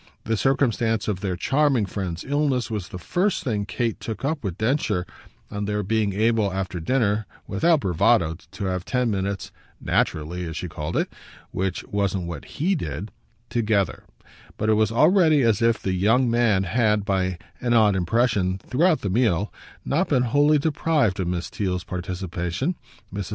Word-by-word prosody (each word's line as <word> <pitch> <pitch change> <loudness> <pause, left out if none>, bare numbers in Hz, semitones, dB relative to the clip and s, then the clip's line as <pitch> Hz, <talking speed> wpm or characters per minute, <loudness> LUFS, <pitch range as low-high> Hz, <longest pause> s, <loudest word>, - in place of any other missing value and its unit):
This 110 -2 -1
circumstance 120 -5 +1
of 105 -4 -1
their 95 -2 -2
charming 135 +2 +2
friend's 95 -3 -4
illness 140 -4 0
was 105 -5 -3
the - - -7
first 180 - 0
thing 105 -7 -1
Kate 115 +3 -2
took 110 +2 -5
up 145 -1 -1
with 95 -4 -3
Densher 110 -6 0 0.5
on 100 0 -3
their 105 0 -1
being 105 0 +1
able 110 0 +2
after 95 -1 -3
dinner, 110 +2 +1 0.2
without 160 - +2
bravado, 90 -2 +2 0.2
to 100 0 -4
have 90 -1 -2
ten 125 0 0
minutes 100 0 -3 0.3
"naturally," 85 +4 -1
as 80 0 -5
she 90 - -4
called 80 -1 -4
it - - -1 0.4
which 95 -1 -2
wasn't 100 -3 -1
what 85 -1 -6
HE 180 +7 -1
did 90 - -4 0.4
together; 105 -5 0 0.5
but 110 - 0
it - - +5
was 110 0 +2
already 155 - +4
as 115 -2 +2
if 115 -1 +3
the 95 - -2
young 110 +8 +3
man 115 -5 +3
had, 105 +1 +1
by 95 -3 0 0.2
an 120 -1 +1
odd 105 -3 +5
impression, 95 0 +1
throughout 155 - +1
the 100 - -2
meal, 105 -3 +1 0.3
not 170 +7 +1
been 130 -4 +3
wholly 145 +5 +4
deprived 145 - +1
of 90 - -1
Miss 85 -1 -2
Theale's 90 -3 -2
participation. 90 - -3 0.4
Mrs. 100 -4 -4
105 Hz, 165 wpm, -24 LUFS, 95-125 Hz, 0.5 s, it